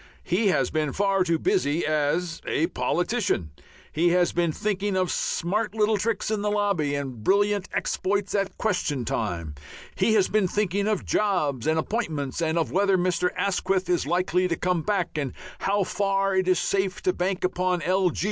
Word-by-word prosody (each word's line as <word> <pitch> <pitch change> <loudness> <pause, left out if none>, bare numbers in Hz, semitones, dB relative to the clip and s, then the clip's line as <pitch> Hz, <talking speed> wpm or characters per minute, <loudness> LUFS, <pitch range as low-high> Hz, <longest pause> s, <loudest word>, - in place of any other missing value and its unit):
He 195 +5 +1
has 190 - +2
been 155 -3 -1
far 195 -1 +2
too 170 -2 +1
busy 150 +1 +1
as 155 +3 0
a 160 - +1
politician. 175 - -1 0.4
He 170 +3 +2
has 175 0 +3
been 170 -2 +1
thinking 200 +2 -2
of 185 -1 +1
smart 210 +5 -1
little 215 0 +2
tricks 220 +1 -1
in 215 -2 0
the 210 - 0
lobby 200 -9 0
and 130 -6 -5
brilliant 205 - +2
exploits 200 +1 -1
at 195 -1 -1
question 150 - -1
time. 85 -10 -3 0.4
He 220 +3 +2
has 195 -3 +4
been 210 -3 +2
thinking 200 +1 0
of 215 -3 -1
jobs 155 - 0
and 160 0 +2
appointments, 160 - -2
of 165 0 0
whether 195 +1 +3
Mr. 180 0 +1
Asquith 190 -1 0
is 175 - +1
likely 180 +1 +1
to 170 - -1
"come 180 0 0
back" 180 -4 -1
and 140 -4 -3 0.3
how 200 0 +1
far 195 0 0
it 185 -1 +1
is 185 -1 +4
safe 195 +1 -1
to 185 - +2
bank 185 +1 -2
upon 180 -2 0
L. 185 +1 +2
185 Hz, 175 wpm, -25 LUFS, 165-200 Hz, 0.4 s, has